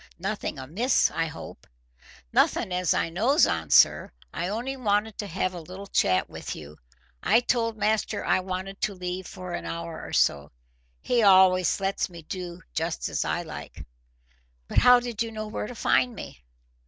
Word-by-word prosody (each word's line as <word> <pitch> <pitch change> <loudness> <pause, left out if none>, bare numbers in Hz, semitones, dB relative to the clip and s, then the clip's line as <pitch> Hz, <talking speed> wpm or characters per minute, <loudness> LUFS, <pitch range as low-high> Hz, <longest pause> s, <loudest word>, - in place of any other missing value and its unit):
"Nothing 195 -2 -3
amiss, 185 - +1
I 165 0 -1
hope?" 145 - -10 0.7
"Nothing - - +2
as 180 -2 0
I 165 - +1
knows 240 - +4
on, - - -2
sir. - - +5 0.2
I 175 - -2
only 235 +7 -3
wanted 215 -3 0
to 205 - -3
have 185 0 -2
a 175 - -7
little 185 +4 -9
chat 95 - +2
with - - -7
you. 75 0 -11 0.4
I 230 - +4
told 230 -2 0
master 215 -1 0
I - - +3
wanted 185 +1 -5
to 205 - -1
leave 180 0 -5
for 180 -1 -8
an - - -4
hour 165 -1 -5
or - - -8
so. 70 0 +2 0.5
He 245 -1 +1
allus 185 -3 +5
lets 195 0 -1
me 170 -2 -11
do 175 +1 -7
just - - -2
as - - -1
I - - -2
like." - - -9 0.8
"But - - +3
how 250 0 +7
did 240 -3 -5
you 230 -1 -1
know 215 -1 -5
where 210 0 -4
to 245 - -8
find 245 +1 +2
me?" 65 - -9
190 Hz, 180 wpm, -26 LUFS, 175-220 Hz, 0.8 s, how